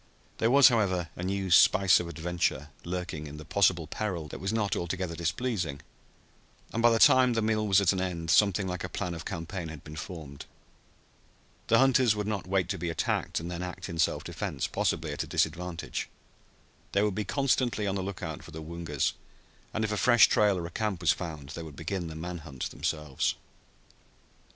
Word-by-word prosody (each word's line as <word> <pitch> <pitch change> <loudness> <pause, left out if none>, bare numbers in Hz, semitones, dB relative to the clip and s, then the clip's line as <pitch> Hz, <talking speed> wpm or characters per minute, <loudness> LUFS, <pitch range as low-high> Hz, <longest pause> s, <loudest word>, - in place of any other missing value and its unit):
There 115 - +3
was, 135 +1 +8
however, 95 -8 +1
a - - -7
new 95 0 -2
spice 95 +2 +6
of 90 - -4
adventure 85 -3 -2
lurking 90 -3 -4
in 75 +1 -9
this 75 - -9
possible 90 -3 +3
peril 85 -2 -3
that - - -7
was 95 +3 -2
not 105 -3 0
altogether 90 0 -3
displeasing, 85 - -2 0.9
and 115 - 0
by 120 - +6
the 115 - +3
time 125 +2 +6
the 115 - +1
meal 110 -1 +1
was 100 -1 +5
at 100 -1 +3
an 95 - -2
end 85 -3 -2
something 100 +3 +4
like 90 -1 -4
a 90 - -4
plan 90 0 -3
of 85 0 -7
campaign 85 +1 -5
had 80 -3 -9
been 75 -1 -10
formed. 80 -4 -8 1.2
The 115 - +5
hunters 130 -4 +4
would 105 -1 -2
not 105 -3 -3
wait 95 -2 +1
to 95 -2 -2
be 85 0 -2
attacked 80 - -1
and 85 +2 -6
then 90 0 -4
act 90 +2 -6
in 85 -1 -6
self - - +1
defense, - - -3
possibly - - -1
at - - -3
a - - -4
disadvantage. 90 -1 -2 0.8
They 100 - +3
would 105 -2 +1
be 105 - -2
constantly 125 -4 +1
on 100 - 0
the 95 - -2
lookout 90 -5 -5
for - - -13
the 80 0 -8
Woongas, 80 -3 -2 0.6
and 110 - -2
if 110 - -1
a 105 - -1
fresh 120 0 +6
trail 105 -2 +3
or 85 - -4
a 85 - -7
camp 105 -5 -2
was 85 - +4
found 75 -6 -5
they 80 +3 -6
would 80 -3 -9
begin 85 +3 -3
the 80 - -7
man 85 +2 -5
hunt 70 -5 -6
themselves. 75 -4 -1
90 Hz, 200 wpm, -29 LUFS, 80-105 Hz, 1.2 s, was